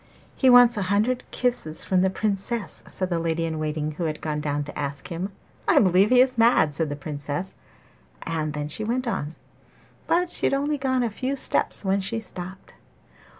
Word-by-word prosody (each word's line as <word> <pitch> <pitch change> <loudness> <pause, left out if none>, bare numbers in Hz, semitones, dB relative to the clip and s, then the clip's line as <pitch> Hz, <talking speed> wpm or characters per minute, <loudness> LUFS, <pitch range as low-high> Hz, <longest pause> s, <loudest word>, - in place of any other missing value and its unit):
'He 260 - +4
wants 245 -2 +7
a - - 0
hundred 215 +5 +1
kisses 240 -11 -2
from 185 -1 +2
the 190 - +3
Princess,' 205 +2 -1
said 185 -1 -3
the 170 - +1
lady 165 0 -1
in 160 -1 -3
waiting 155 0 -2
who 165 +3 -4
had 155 -1 -2
gone 150 -1 -2
down 145 -1 -1
to 145 - -9
ask 140 +1 -4
him. 180 +3 -4 0.4
'I - - +4
believe 190 +1 +4
he 255 - +5
is 255 -2 +2
mad!' 225 -10 +4
said 155 +1 0
the 145 - -3
Princess, 145 +4 -4 0.7
and 155 -3 -2
then 150 -1 -3
she 155 +8 -2
went 245 +4 -1
on; 160 -9 -3 0.7
but 350 +1 +2
she - - 0
had - - +1
only 290 +1 -1
gone 260 -2 +1
a 235 - -1
few 260 +6 -2
steps 260 - -1
when 195 +1 +2
she 225 +4 -3
stopped. 185 -3 -9
190 Hz, 195 wpm, -25 LUFS, 155-240 Hz, 0.7 s, wants